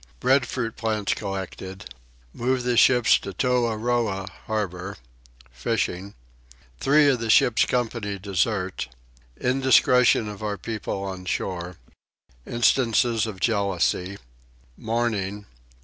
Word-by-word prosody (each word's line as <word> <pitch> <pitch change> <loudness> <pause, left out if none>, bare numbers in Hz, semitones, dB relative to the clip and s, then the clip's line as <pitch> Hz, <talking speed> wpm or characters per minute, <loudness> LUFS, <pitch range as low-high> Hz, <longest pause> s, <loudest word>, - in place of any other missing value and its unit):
Breadfruit 125 -3 +1
Plants 110 -3 -1
collected. 95 -6 -6 0.4
Move 125 +1 -1
the 120 0 +1
Ship 120 0 +5
to 100 - +3
Toahroah 115 -4 0 0.2
Harbour. 100 -3 -3 0.5
Fishing. 100 - -2 0.6
Three 145 +2 +4
of 135 -3 +3
the 115 -1 -4
Ship's 115 +1 +5
Company 115 -5 -2
desert. 95 0 -1 0.5
Indiscretion 125 -4 +4
of 105 0 -8
our 105 -1 -2
People 105 -1 -4
on 95 -1 -6
Shore. 90 0 -3 0.7
Instances 120 -1 +2
of 100 -4 -7
Jealousy. 100 -3 0 0.6
Mourning. 105 - -2
110 Hz, 100 wpm, -24 LUFS, 95-120 Hz, 0.7 s, Ship